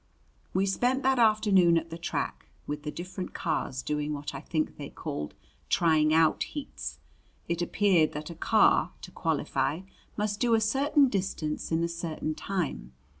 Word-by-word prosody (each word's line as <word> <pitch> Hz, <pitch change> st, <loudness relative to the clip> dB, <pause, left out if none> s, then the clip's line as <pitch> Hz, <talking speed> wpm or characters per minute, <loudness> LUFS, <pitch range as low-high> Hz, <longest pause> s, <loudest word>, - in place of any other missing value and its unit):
We 190 Hz, +1 st, +1 dB
spent 245 Hz, +7 st, +1 dB
that 265 Hz, -1 st, +3 dB
afternoon 205 Hz, -6 st, +5 dB
at 165 Hz, 0 st, -3 dB
the 165 Hz, -, -5 dB
track, 165 Hz, -, -3 dB, 0.2 s
with 150 Hz, 0 st, -4 dB
the 150 Hz, -, -4 dB
different 180 Hz, +3 st, -6 dB
cars 140 Hz, -6 st, -2 dB
doing 150 Hz, 0 st, -1 dB
what 145 Hz, 0 st, -5 dB
I -, -, -6 dB
think 155 Hz, -2 st, -2 dB
they -, -, -6 dB
called 75 Hz, 0 st, -5 dB, 0.3 s
"trying 155 Hz, -2 st, +3 dB
out 160 Hz, 0 st, +4 dB
heats." 295 Hz, -2 st, -5 dB, 0.5 s
It 170 Hz, 0 st, -1 dB
appeared 175 Hz, -3 st, +3 dB
that 150 Hz, +2 st, -5 dB
a -, -, -8 dB
car, -, -, +3 dB
to -, -, -9 dB
qualify, 160 Hz, +5 st, -1 dB, 0.4 s
must 210 Hz, 0 st, -1 dB
do 235 Hz, -2 st, +3 dB
a -, -, +3 dB
certain 275 Hz, +6 st, +3 dB
distance 185 Hz, -9 st, -2 dB
in 165 Hz, +1 st, +2 dB
a -, -, +2 dB
certain 165 Hz, -2 st, -3 dB
time. 150 Hz, -, -3 dB
170 Hz, 165 wpm, -28 LUFS, 155-205 Hz, 0.5 s, afternoon